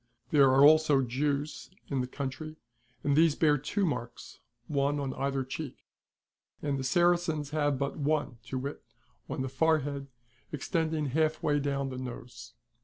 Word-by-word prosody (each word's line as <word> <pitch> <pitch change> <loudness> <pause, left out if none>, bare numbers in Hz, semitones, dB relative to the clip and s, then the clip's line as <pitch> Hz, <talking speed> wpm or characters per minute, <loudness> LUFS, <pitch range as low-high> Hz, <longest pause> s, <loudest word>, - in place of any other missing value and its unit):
There 140 -3 +6
are 135 +2 +7
also 150 -3 +6
Jews 140 +4 -2 0.2
in 135 -3 0
the 125 - -3
country 140 +4 -5 0.5
and 140 -1 +2
these 160 -1 +5
bear 150 -3 +3
two 190 +9 -1
marks, 125 -7 -5 0.3
one 145 0 +1
on 135 -2 -2
either 135 -1 -1
cheek; 135 +1 -6 0.8
and 140 -2 -2
the - - -3
Saracens 170 0 +2
have 145 -2 +1
but 140 +1 -2
one, 145 -5 -1
to 130 - -3
wit, 140 +3 -5 0.5
on 130 - -2
the - - -2
forehead 140 0 0 0.4
extending 155 0 -1
halfway 155 0 +1
down 140 -1 -1
the 130 -1 -6
nose. 125 -1 -8
145 Hz, 150 wpm, -30 LUFS, 135-155 Hz, 0.8 s, are